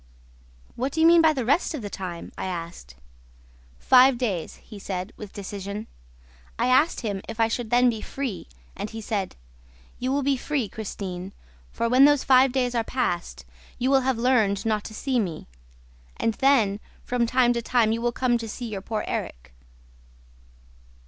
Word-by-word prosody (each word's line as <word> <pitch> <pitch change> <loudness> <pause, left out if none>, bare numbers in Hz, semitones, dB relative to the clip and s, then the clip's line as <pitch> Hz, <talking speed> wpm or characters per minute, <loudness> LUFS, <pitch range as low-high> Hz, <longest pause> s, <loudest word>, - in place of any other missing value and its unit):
'What 260 +3 -2
do 320 - -2
you 320 - +5
mean 335 0 +7
by 320 -1 +5
the 265 -6 -2
rest 295 +6 +1
of 260 - -6
the 205 - -4
time?' 180 -3 -6
I - - -5
asked. 165 - -7 0.8
'Five 255 - +5
days,' 205 -10 -2
he 210 -3 -13
said, 185 +1 -5
with 210 -2 -9
decision. 200 +1 -6 0.7
I 235 - +1
asked 285 +6 +3
him 205 -5 -3
if 225 0 -7
I 225 - +4
should 230 0 -3
then 245 +2 +4
be 225 -3 0
free 265 -8 -5 0.3
and 210 - -5
he 225 - -7
said, 205 -3 -3 0.6
'You 255 +1 -1
will 280 +1 0
be 275 0 +1
free, 270 -3 -2
Christine, 190 -3 -6 0.4
for, 230 - -1
when 255 +3 +6
those 290 -2 +4
five 260 0 +5
days 250 -1 0
are 230 -2 +1
past, 175 - -3 0.3
you 255 +2 0
will 270 -1 +5
have 260 -2 0
learned 230 -5 +2
not 215 -2 0
to 215 - -8
see 260 +1 0
me; 175 -8 -3 0.7
and 225 - 0
then, 225 -7 +3 0.2
from 245 -1 0
time 245 0 +3
to 235 - -2
time, 230 -2 +2
you 230 +1 -1
will 240 0 +1
come 240 -1 +1
to 225 -1 -6
see 245 +3 -6
your 205 -3 -5
poor 215 +2 -3
Erik!' - - -5
230 Hz, 180 wpm, -25 LUFS, 200-255 Hz, 0.8 s, mean